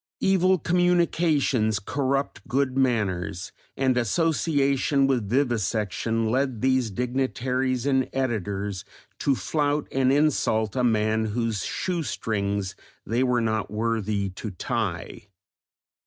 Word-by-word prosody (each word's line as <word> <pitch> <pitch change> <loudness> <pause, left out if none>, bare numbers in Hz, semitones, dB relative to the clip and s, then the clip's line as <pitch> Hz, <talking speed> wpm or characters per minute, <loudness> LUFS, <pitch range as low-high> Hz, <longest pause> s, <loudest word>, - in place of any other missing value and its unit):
Evil 190 -1 +3
communications 165 - +2
corrupt 135 +5 -2
good 130 +1 0
manners, 100 -9 0 0.3
and 130 -2 +2
association 140 - +2
with 125 -7 0
vivisection 115 -2 0
led 130 -2 0
these 130 -2 +2
dignitaries 130 +2 -1
and 130 -2 +1
editors 105 -7 -2 0.4
to 140 - +2
flout 145 +6 -1
and 130 -1 +2
insult 135 -7 +1
a 125 - +1
man 110 -1 +2
whose 110 -1 -1
shoe 180 -2 -2
strings 100 -8 -2 0.3
they 115 +3 0
were 125 -2 +2
not 110 -1 -1
worthy 105 -2 -1
to 105 +4 -6
tie. 100 -3 -4
125 Hz, 110 wpm, -25 LUFS, 110-135 Hz, 0.4 s, Evil